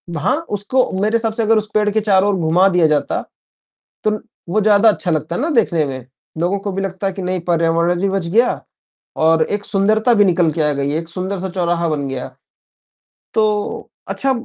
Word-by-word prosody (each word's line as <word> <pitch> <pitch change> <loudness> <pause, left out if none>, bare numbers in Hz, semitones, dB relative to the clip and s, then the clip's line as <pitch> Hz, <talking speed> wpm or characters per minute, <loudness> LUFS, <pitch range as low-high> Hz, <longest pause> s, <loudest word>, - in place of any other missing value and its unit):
ब 170 - -4
हाँ, 160 - +1
उसको 210 +6 0
मेरे 215 +2 +1
हिसाब 225 -1 0
से 225 - -1
अगर 220 +1 +3
उस 215 0 -2
पेड़ 210 -1 +2
के 215 +1 +1
चारों 200 -1 +3
ओर - - +1
घुमा 170 +4 +3
दिया 175 -3 +3
जाता, 150 -1 0 0.8
तो 215 - +3
ल 215 0 -3 0.3
वो 205 +5 +1
ज़्यादा 210 +1 +5
अच्छा 200 -4 +1
लगता 155 +1 -1
है - - -2
ना 305 - 0
देखने 175 - +2
में। 130 -2 -6 0.3
लोगों 175 +4 0
को 200 +1 -4
भी 195 +1 -3
लगता 195 0 -4
है 195 - -1
कि 190 - -6
नहीं 185 0 -2
पर्यावरण 170 +1 +1
भी 195 - +1
बच 195 -3 -2
गया 230 +8 +2 0.7
और 160 0 +4
एक 205 +4 -3
सुंदरता 215 +4 +2
भी 205 -2 +4
निकल 175 -3 +2
के 155 - -2
आ 150 -1 +2
गई, 140 0 -2
एक 165 +1 -3
सुंदर 185 +3 -3
सा 190 +1 -4
चौराहा 175 -2 -1
बन 145 -3 -2
गया। 130 -2 -4 1.1
तो 210 -1 -1 0.2
अच्छा 270 - 0
190 Hz, 215 wpm, -18 LUFS, 170-210 Hz, 1.1 s, ज़्यादा